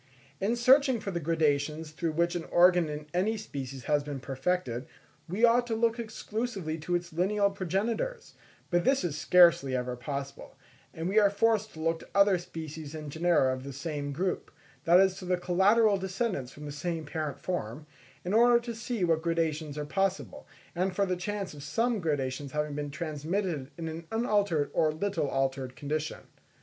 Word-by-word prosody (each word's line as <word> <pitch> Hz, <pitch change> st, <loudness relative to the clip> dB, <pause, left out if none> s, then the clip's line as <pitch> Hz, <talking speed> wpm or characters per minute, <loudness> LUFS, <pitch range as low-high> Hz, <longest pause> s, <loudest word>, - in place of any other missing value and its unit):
In 215 Hz, +5 st, +1 dB
searching 260 Hz, +1 st, +5 dB
for 200 Hz, -, -4 dB
the 170 Hz, -, -2 dB
gradations 155 Hz, -1 st, 0 dB
through 160 Hz, 0 st, -2 dB
which 170 Hz, +2 st, +1 dB
an 170 Hz, -, -3 dB
organ 175 Hz, -2 st, +4 dB
in 150 Hz, 0 st, -5 dB
any 205 Hz, +5 st, +1 dB
species 135 Hz, -10 st, -6 dB
has 145 Hz, +1 st, +1 dB
been 145 Hz, -2 st, -5 dB
perfected, 135 Hz, -1 st, -2 dB, 0.4 s
we 205 Hz, +7 st, +3 dB
ought 240 Hz, +1 st, +3 dB
to 225 Hz, -, -1 dB
look 230 Hz, +1 st, +1 dB
exclusively 215 Hz, -6 st, -4 dB
to 175 Hz, +3 st, -1 dB
its 175 Hz, -1 st, -3 dB
lineal 200 Hz, +4 st, +2 dB
progenitors; 220 Hz, -, -2 dB, 0.4 s
but 175 Hz, 0 st, +3 dB
this 270 Hz, +4 st, +2 dB
is 165 Hz, -5 st, -2 dB
scarcely 170 Hz, -5 st, +5 dB
ever 125 Hz, 0 st, -2 dB
possible, 140 Hz, +2 st, -6 dB, 0.3 s
and 165 Hz, +1 st, -4 dB
we 200 Hz, +4 st, +4 dB
are 205 Hz, -1 st, +5 dB
forced 220 Hz, +1 st, +1 dB
to 160 Hz, -, -11 dB
look 165 Hz, +1 st, 0 dB
to -, -, -13 dB
other 200 Hz, -2 st, +5 dB
species 160 Hz, -3 st, -7 dB
and 150 Hz, -2 st, -6 dB
genera 160 Hz, -5 st, +3 dB
of 130 Hz, 0 st, -6 dB
the 140 Hz, -, -6 dB
same 145 Hz, +1 st, -4 dB
group, 180 Hz, +6 st, -2 dB, 0.4 s
that 175 Hz, +2 st, +7 dB
is 190 Hz, -1 st, +3 dB
to 185 Hz, -, -8 dB
the 180 Hz, 0 st, +1 dB
collateral 200 Hz, +4 st, +4 dB
descendants 190 Hz, -, -2 dB
from 150 Hz, +2 st, -10 dB
the 145 Hz, -, -5 dB
same 160 Hz, +2 st, -3 dB
parent 150 Hz, -1 st, -4 dB
form, 150 Hz, -5 st, -4 dB, 0.4 s
in 180 Hz, -, -1 dB
order 240 Hz, +2 st, +6 dB
to 235 Hz, 0 st, -6 dB
see 225 Hz, -2 st, -3 dB
what 165 Hz, -2 st, +2 dB
gradations 160 Hz, -3 st, -1 dB
are 150 Hz, -, -3 dB
possible, 195 Hz, +4 st, -2 dB, 0.3 s
and 185 Hz, +1 st, -1 dB
for 200 Hz, -, +2 dB
the 185 Hz, -1 st, -1 dB
chance 200 Hz, +1 st, -4 dB
of 145 Hz, -, -10 dB
some 225 Hz, -, 0 dB
gradations 140 Hz, -4 st, -2 dB
having 150 Hz, -1 st, -1 dB
been 145 Hz, 0 st, -3 dB
transmitted 155 Hz, 0 st, -3 dB
in 165 Hz, -1 st, -4 dB
an 160 Hz, +1 st, -6 dB
unaltered 205 Hz, -9 st, +1 dB
or 155 Hz, -1 st, +3 dB
little 180 Hz, -1 st, -1 dB
altered 135 Hz, -1 st, -1 dB
condition. 155 Hz, +1 st, -3 dB
170 Hz, 185 wpm, -29 LUFS, 150-200 Hz, 0.4 s, that